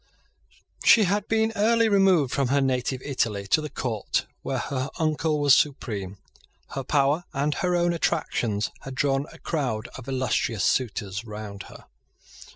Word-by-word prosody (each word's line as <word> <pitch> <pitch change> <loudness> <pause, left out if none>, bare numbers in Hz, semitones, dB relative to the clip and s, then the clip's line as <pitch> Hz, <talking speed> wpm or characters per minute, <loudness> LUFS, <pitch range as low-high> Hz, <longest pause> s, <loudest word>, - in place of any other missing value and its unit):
She 225 - +7
had 200 +2 0
been 225 0 +1
early 230 +2 +3
removed 190 - +3
from 140 -2 +1
her 140 +3 +2
native 130 -1 -1
Italy 110 -8 -1
to 125 +11 +2
the 150 - -5
court 115 -7 -2 0.2
where 135 - -2
her 130 +1 -3
uncle 155 -1 0
was 145 -2 +5
supreme. 105 -10 -1 0.6
His 135 -1 -4
power 145 +4 +2
and 145 +2 0
her 180 +2 0
own 175 0 +2
attractions 105 -10 -1
had 135 -1 -8
drawn 135 +1 +1
a - - -13
crowd 125 -8 -2
of 130 -1 -10
illustrious 130 -5 0
suitors 105 -3 -1
round 105 -3 -8
her. - - -13
135 Hz, 155 wpm, -25 LUFS, 115-160 Hz, 0.6 s, She